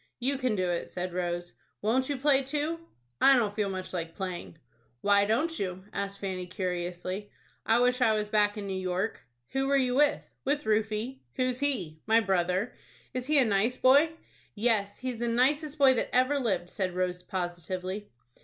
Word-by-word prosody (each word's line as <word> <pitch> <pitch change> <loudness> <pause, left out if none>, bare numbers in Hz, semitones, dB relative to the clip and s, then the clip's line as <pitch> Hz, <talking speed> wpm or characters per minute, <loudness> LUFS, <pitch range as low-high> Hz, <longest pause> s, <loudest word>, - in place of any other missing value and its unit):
"You 265 +2 0
can 255 -4 +1
do 185 -2 0
it," 175 -1 -2
said 180 0 -4
Rose. 175 -1 -3 0.3
"Won't 255 +5 +1
you 285 - -1
play 275 0 +4
too?" 300 +4 -2 0.4
"I 275 - +8
don't 210 -4 0
feel 210 -2 0
much 185 -1 -5
like 165 -2 -4
playing." 185 -4 -5 0.4
"Why 200 0 +4
don't 300 +11 0
you?" 185 -1 -3
asked 200 0 -3
Fanny, 185 -2 -4
curiously. 180 +1 -4 0.4
"I 225 - +5
wish 250 +1 +2
I 225 -3 +5
was 210 -1 -1
back 210 0 +2
in 205 - -4
New 195 - -3
York." 185 +4 -2 0.3
"Who 270 0 0
were 280 0 +3
you 255 -2 +1
with?" 290 +2 +2 0.2
"With 290 +2 0
Rufie." 220 +4 0 0.2
"Who's 255 -1 0
he?" 190 - 0
"My 225 +1 +5
brother." 190 0 0 0.4
"Is 255 0 -3
he 305 0 +5
a 265 - +6
nice 220 +4 +1
boy?" 280 +5 +6 0.5
"Yes, 205 -2 +1
he's 255 -3 -4
the 240 - 0
nicest 285 +6 +1
boy 275 -3 +6
that 245 - -1
ever 255 +3 +3
lived," 190 -8 -1
said 185 -3 -2
Rose, 180 -1 -1
positively. 185 +2 -4
215 Hz, 180 wpm, -29 LUFS, 185-255 Hz, 0.5 s, I